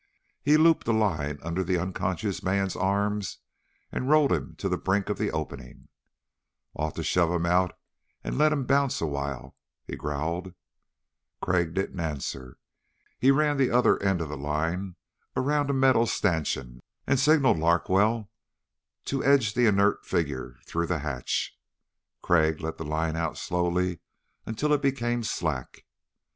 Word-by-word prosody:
He 150 +4 +4
looped 160 +1 +4
a 115 - +3
line 80 -10 0
under 85 +3 -1
the 90 0 0
unconscious 95 +2 -2
man's 95 0 0
arms 100 +1 -1 0.5
and 130 - -3
rolled 150 -2 +5
him 70 -6 -1
to - - -3
the - - -1
brink 95 +1 0
of 105 - -2
the 105 - 0
opening. 75 -5 -6 0.8
"Ought 75 0 -3
to - - -3
shove 85 -2 +2
him 85 -1 0
out 90 +1 +2 0.5
and - - -3
let 155 +2 +4
him 140 -4 0
bounce 140 0 +2
a - - -1
while," 70 -3 -4 0.3
he - - -6
growled. 80 +6 -3 0.8
Crag 85 -2 0
didn't 95 -1 -2
answer. 70 -5 -4 0.6
He 130 - +4
ran 145 +1 +3
the 135 -2 +3
other 125 +1 +3
end 95 -3 +1
of 80 - -4
the 75 - -5
line 80 +6 -2 0.4
around 145 +2 +1
a - - +2
metal 130 -3 +4
stanchion 65 - -1 0.3
and 135 -1 +2
signaled 140 - +4
Larkwell 100 +6 +2 0.7
to 135 -1 -2
edge 135 -7 +4
the 120 0 +3
inert 100 0 +3
figure 75 -8 -2
through 85 0 -2
the 90 - 0
hatch. 65 -5 -2 0.7
Crag 80 -2 +3
let 80 0 -5
the - - -3
line 80 +1 -1
out 80 -1 -2
slowly 90 0 -1 0.5
until 145 +7 0
it 145 - +2
became 120 -3 0
slack. 80 - -3
90 Hz, 155 wpm, -27 LUFS, 80-120 Hz, 0.8 s, rolled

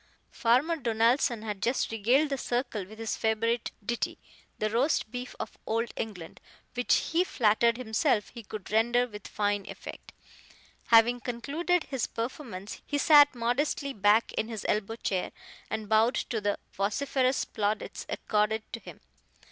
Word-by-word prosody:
Farmer 260 +8 +2
Donaldson 235 -1 +2
had 210 -3 -4
just 240 +4 0
regaled 245 +8 +3
the 275 - 0
circle 240 -6 -2
with 215 +2 -12
his 225 -1 -2
favorite 230 +1 0 0.2
ditty, 235 +1 -2 0.4
The 215 0 -1
Roast 240 -1 +1
Beef 250 0 -6
of - - -6
Old 230 +1 -1
England, 190 -7 -6 0.3
which 245 0 +1
he 335 +2 +3
flattered 235 - +2
himself 220 -1 +1
he 235 - -9
could 210 -1 -8
render 240 +3 +3
with 210 -3 -9
fine 205 -1 -1
effect. - - -9 0.8
Having 235 +1 +6
concluded 290 +9 -1
his 265 -4 -2
performance, 230 -5 -6
he 290 - -2
sat 290 -2 +7
modestly 275 +4 0
back 210 +1 +3
in 220 - -1
his 225 -3 -6
elbow 215 +1 0
chair, 190 -5 -2 0.4
and 220 -1 -3
bowed 220 +3 +4
to 225 -3 -2
the 205 0 0 0.2
vociferous 255 +6 0
plaudits 210 0 -3
accorded 215 +1 0
to - - -3
him. - - -12
230 Hz, 150 wpm, -29 LUFS, 215-255 Hz, 0.8 s, sat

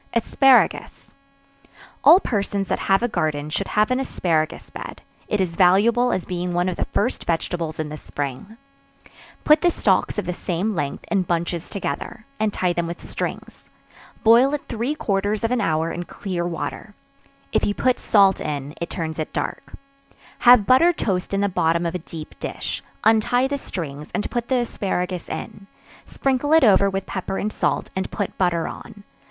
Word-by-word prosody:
Asparagus. 260 +2 +3 0.9
All 365 - +9
persons 200 - -2
that - - 0
have 195 +4 +4
a - - +3
garden 155 -8 -2
should 195 +5 -2
have 215 +3 +1
an 255 - +2
asparagus 165 -11 -1
bed; - - -8 0.2
it 210 - -1
is 180 -3 -1
valuable 220 +7 +4
as 185 - -1
being 180 0 -3
one 175 +1 +1
of 185 - -1
the - - -2
first 240 +5 -1
vegetables 165 -1 -2
in 155 -1 -2
the 150 - -6
spring. 145 - -6 0.9
Put 300 0 +5
the 350 - +4
stalks - - +1
of - - -1
the 180 - -2
same 180 +5 -2
length, 145 -6 -3
in 195 - +3
bunches 170 -1 -2
together, 215 +2 -5
and 215 -1 +1
tie 180 -3 0
them 170 -1 -1
with 170 +1 -7
strings; - - -6 0.5
boil 245 +6 +6
it 290 - -6
three 240 +5 -2
quarters 205 -3 -1
of 230 - 0
an 250 -2 +1
hour 160 -3 0
in 175 0 -5
clear 175 -2 -4
water; 175 +5 -5 0.6
(if - - +1
you 205 - 0
put 255 -1 +1
salt 200 -3 +4
in, 145 -1 -4
it 170 - -3
turns 160 -2 -4
it 155 - -3
dark;) - - -4 0.7
have 245 -4 +7
buttered 325 - +5
toast 185 -3 -1
in 195 0 0
the 200 - +2
bottom 170 -2 +1
of 170 - -1
a 180 - -3
deep 160 -1 -9
dish; - - -4 0.2
untie 225 +4 +3
the 285 - -2
strings, 150 - -6
and 210 - -2
put 240 -1 -2
the 260 - +2
asparagus 185 -6 -3
in; 195 - -7 0.4
sprinkle 270 +2 0
it 320 -2 +6
over 200 -3 +5
with 195 0 -3
pepper 190 0 -4
and 210 +1 -2
salt, - - -1
and 190 - -2
put 205 - -4
butter 170 -3 +1
on. 205 -1 -10
195 Hz, 180 wpm, -22 LUFS, 170-230 Hz, 0.9 s, All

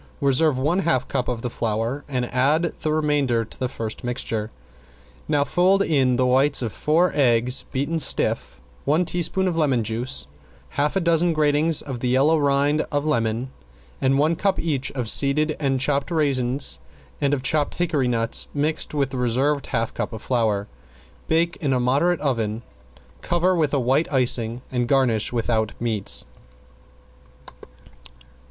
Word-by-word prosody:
Reserve 140 0 +2
one 150 +8 +1
half 130 -9 0
cup 130 -3 -2
of 120 -2 -3
the 125 - -2
flour 115 +6 -2
and 130 -3 -2
add 150 +7 +2
the 155 - -1
remainder 145 -7 +1
to - - -15
the 130 - -1
first 115 -1 -5
mixture. 115 -3 -2 0.8
Now 145 -1 +2
fold 185 +6 +2
in 135 -7 +2
the 130 +1 +1
whites 130 +2 +3
of 115 - -3
four 165 +4 +2
eggs 125 -2 +2
beaten 145 +5 -1
stiff, 60 - 0 0.2
one 155 +6 +2
teaspoon 180 +2 0
of 175 - -1
lemon 135 -7 +2
juice, 115 - -2 0.4
half 145 - -1
a - - +3
dozen 170 -1 +2
gratings 155 +1 +2
of 130 -4 -6
the 125 - -2
yellow 140 +5 +3
rind 145 +1 +2
of 145 0 -1
lemon 115 -3 -1 0.5
and 135 0 +2
one 155 +4 +2
cup 195 +3 0
each 140 -5 -1
of 125 -4 -3
seeded 150 +6 +3
and 135 -3 0
chopped 140 +3 0
raisins 140 -5 0 0.4
and 140 -1 +2
of 140 -3 -1
chopped 145 +2 0
hickory 155 -7 0
nuts 115 -2 +1
mixed 150 +1 -1
with 140 -2 0
the 130 - -4
reserved 130 +4 0
half 115 -3 -2
cup - - -4
of 110 - -8
flour. 110 -5 0 0.6
Bake 170 +1 +1
in 140 -4 -1
a 130 - +1
moderate 140 +8 +1
oven, 115 -5 -1 0.6
cover 175 +2 +1
with 155 -5 +1
a 140 - +1
white 135 +6 +1
icing 120 -2 +1
and 125 -2 -1
garnish 125 -5 +2
without 115 -2 -1
meats. 110 -4 -2
135 Hz, 160 wpm, -23 LUFS, 120-155 Hz, 0.8 s, whites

